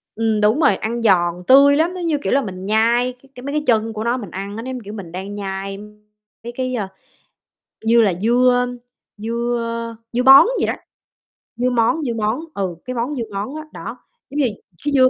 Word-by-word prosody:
Ừm, 220 -1 0
đúng 215 +8 +3
rồi, 240 -10 +4
ăn 230 +4 -3
giòn, 180 -4 +2
tươi 280 +2 +7
lắm, 330 +3 +1
nó 370 - -6
như, 325 -3 +1
kiểu, - - 0
là 280 - +4
mình 190 -5 -6
nhai 235 +4 +2
cái 275 - -21
cái 250 - -10
mấy 280 +2 -4
cái 300 - 0
chân 225 -1 +2
của 215 0 -4
nó 240 +2 0
mình 205 -8 -8
ăn 200 +2 -6
á, 225 - -5
nó 255 - -6
giống, 255 - -4
kiểu, 205 +1 -8
mình 195 -6 -8
đang 190 +3 -6
nhai 195 -1 -4 0.7
mấy 235 - -6
cái, 255 0 -2
ơ, 205 -5 -2 1.0
như 230 +1 +5
là 200 -4 +3
dưa, 245 +3 +4
ơm, 245 0 0 0.4
dưa, 235 +3 -2
ơ, 230 0 -4 0.2
dưa 245 +1 +1
bón 270 +1 +9
vậy - - +1
đó, - - 0 0.8
dưa 250 +1 +1
món, 245 +6 +1
dưa 245 -4 -1
món, 220 +3 0
ừ, 190 -3 -3
cái 255 +1 -4
món 245 +5 -2
dưa 240 - -2
món 205 +8 -4
á, 310 - -5
đó, - - -7 0.3
giống 285 - -6
như 280 - +3 0.4
cái 290 - 0
dưa 255 -2 +6
230 Hz, 225 wpm, -20 LUFS, 210-255 Hz, 1.0 s, bón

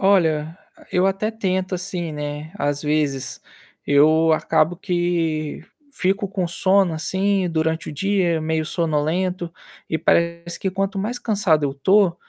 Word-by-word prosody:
Olha, 165 -5 +2 0.4
eu 180 +1 +3
até 195 +3 0
tento, 190 -4 -1
assim, 175 -2 -4
né, 150 +1 -5
às 145 -2 -1
vezes. 145 -3 -1 0.5
Eu 155 +3 +5
acabo 155 +2 +1
que 170 -4 -1 0.3
fico 195 -1 0
com 190 -2 -2
sono, 185 +2 +2
assim, 190 +3 0
durante 160 -1 -1
o - - -5
dia, 185 0 +1
meio 160 0 -1
sonolento. 170 +3 -1 0.4
E 160 - 0
parece 170 +1 0
que 190 - -1
quanto 195 +2 -2
mais 225 +5 -2
cansado 200 -10 +1
eu 140 - -1
tô, 190 +5 +3
170 Hz, 135 wpm, -22 LUFS, 155-190 Hz, 0.5 s, Eu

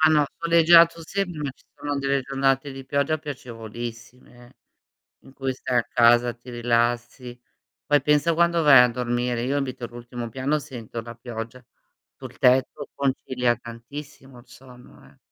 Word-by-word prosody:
Ah, 155 - +6
no, 150 -2 +4
soleggiato 170 0 +5
sempre, 180 -2 -3
ma 145 -2 -2
ci - - -28
sono 145 -1 -4
delle 140 0 0
giornate 135 +1 0
di 135 0 -9
pioggia 140 +3 0
piacevolissime 120 -2 -9 0.6
in 135 - -17
cui 135 -1 -3
stai 130 -1 -3
a 120 - +1
casa, 120 +1 +4
ti 120 +1 -14
rilassi. 120 +1 -1 0.5
Poi 145 0 +3
pensa 150 +3 +2
quando 170 0 +2
vai 135 -5 +8
a 125 - +4
dormire: 120 0 -2
io 135 +4 -1
abito 135 -3 -3
all'ultimo 120 0 -7
piano 135 +5 -1
sento 120 -6 -8
la 115 +1 -10
pioggia 115 +1 -8 0.5
sul - - -11
tetto, 130 +3 +2
concilia 130 -3 0
tantissimo 125 +3 -11
il 120 - -23
sonno, 125 0 -16
eh. - - -22
130 Hz, 155 wpm, -24 LUFS, 120-145 Hz, 0.6 s, vai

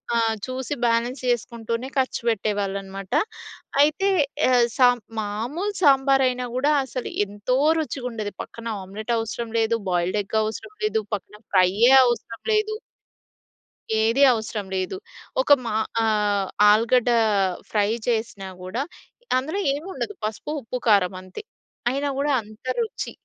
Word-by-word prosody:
ఆహ్, 225 -1 +2
చూసి 260 +3 -3
బ్యాలెన్స్ 235 +3 +1
చేసుకుంటూనే 235 0 -2
ఖర్చు 260 -2 0
పెట్టేవాళ్ళనమాట. 195 -2 -2 0.7
అయితే 310 +7 +3 0.4
ఆహ్, 245 -2 +5
సాం 245 -1 +6 0.2
మామూలు 240 - -3
సాంబారయినా 270 -3 +4
గూడా 285 +4 +2
అసలు 255 -1 -5 0.2
ఎంతో 205 +5 -1 0.2
రుచిగుండేది. 245 -9 -4
పక్కన 230 0 -12 0.2
ఆమ్లెటు 215 +5 -4
అవసరం 225 +1 -4
లేదు. 225 +1 +2
బాయిల్డ్ 180 +3 +1
ఎగ్ 220 +3 -2
అవసరం 305 - -5
లేదు. 220 - +1
పక్కన 200 - -10 0.2
ఫ్రైయ్యే 195 +7 +5
అవసరం 235 -1 -2
లేదు. 430 0 +1 1.3
ఏది 230 +5 +3
అవసరం 220 -2 -4
లేదు. 185 - -2 0.4
ఒక 265 - -5 0.2
మా 215 - -2 0.3
ఆహ్, 210 -3 +1 0.2
ఆలుగడ్డ 235 +3 +3 0.6
ఫ్రై 210 -1 +2 0.2
చేసినా 220 -4 -1 0.2
గూడా 225 +9 -2 0.5
అందులో 310 +10 -2
ఏముండదు 375 +7 -5
పసుపు, 215 +7 -4
ఉప్పు, 240 +3 -4
కారమంతే. 185 -2 +1 0.5
అయినా 280 +2 -1
గూడా 285 +1 +1
అంత 215 +3 -16
రుచి. 455 -2 -3
230 Hz, 120 wpm, -24 LUFS, 210-260 Hz, 1.3 s, సాం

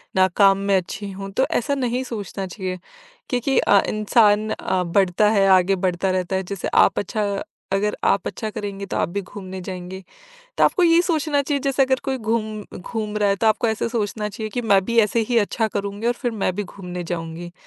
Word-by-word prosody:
ना 185 0 +5
काम 195 -1 +6
में 200 - +4
अच्छी 195 +2 -5
हूँ 195 +1 -7
तो 260 +7 +2
ऐसा 280 +4 0
नहीं 250 -1 -1
सोचना 200 -4 -5
चाहिए 185 -1 -5 0.5
क्योंकि 250 +2 0
अ, 200 -1 +5
इंसान 215 0 +3
अ, 185 -3 -1
बढ़ता 185 +3 +2
है 200 -2 +3
आगे 190 +1 +5
बढ़ता 185 0 0
रहता 185 0 -1
है 190 - 0
जैसे 190 0 -4
आप - - +5
अच्छा 215 +1 -2 0.5
अगर 210 +2 +1
आप 200 - +2
अच्छा 220 - -4
करेंगे 200 -1 -5
तो - - -3
आप - - 0
भी 200 +3 -3
घूमने 190 -1 -8
जाएँगे। 185 +1 -7 0.5
तो - - +4
आपको 365 - +3
ये 335 0 +5
सोचना 310 -4 +1
चाहिए 280 0 -1
जैसे 275 -1 +2
अगर 260 0 +1
कोई 265 -1 -1
घूम 220 -2 -2 0.2
घूम 215 +2 -4
रहा 205 -1 +2
है 200 - +2
तो 225 - +2
आपको 220 +2 +2
ऐसे 220 +1 -1
सोचना 215 -2 -2
चाहिए 215 +2 -5
कि 245 - -2
मैं 200 -4 +3
भी 235 +2 -1
ऐसे 220 +1 +2
ही 240 - +2
अच्छा 220 +2 0
करूँगी 205 +2 -3
और 240 - +3
फिर 245 0 -3
मैं 205 -4 -1
भी 205 - -2
घूमने 180 -2 -7
जाऊँगी। 170 0 -5
205 Hz, 210 wpm, -22 LUFS, 190-230 Hz, 0.5 s, काम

